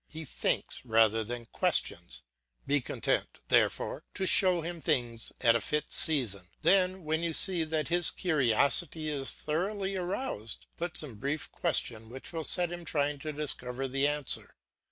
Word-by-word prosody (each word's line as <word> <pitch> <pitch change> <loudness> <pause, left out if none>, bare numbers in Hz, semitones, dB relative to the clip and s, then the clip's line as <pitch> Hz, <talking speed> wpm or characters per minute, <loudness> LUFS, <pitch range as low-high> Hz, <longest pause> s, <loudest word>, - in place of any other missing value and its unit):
He 160 0 -8
thinks - - -1
rather 110 -2 +3
than 120 +1 -6
questions. 65 - -1 0.4
Be 140 0 +2
content, - - -2
therefore, - - +1
to 190 - -1
show 185 -2 +4
him 170 0 -6
things 120 -4 0
at 115 -2 +5
a 115 - +1
fit 150 +7 -2
season; 115 - +2 0.2
then, 185 -1 +3
when 160 +1 -1
you 170 -1 -1
see 180 0 +2
that 155 0 -2
his 175 0 +2
curiosity 155 +1 +1
is 140 -3 -3
thoroughly 195 +5 -3
aroused, 180 - -4
put 175 0 -4
some 130 -8 0
brief 145 +4 -3
question 115 -9 -1
which 130 +7 -10
will 165 -1 -3
set 175 +2 +6
him 175 0 -7
trying 145 -3 -1
to 155 +1 -5
discover 135 -3 -4
the 135 +2 +1
answer. 145 -2 -2
150 Hz, 155 wpm, -30 LUFS, 125-170 Hz, 0.4 s, set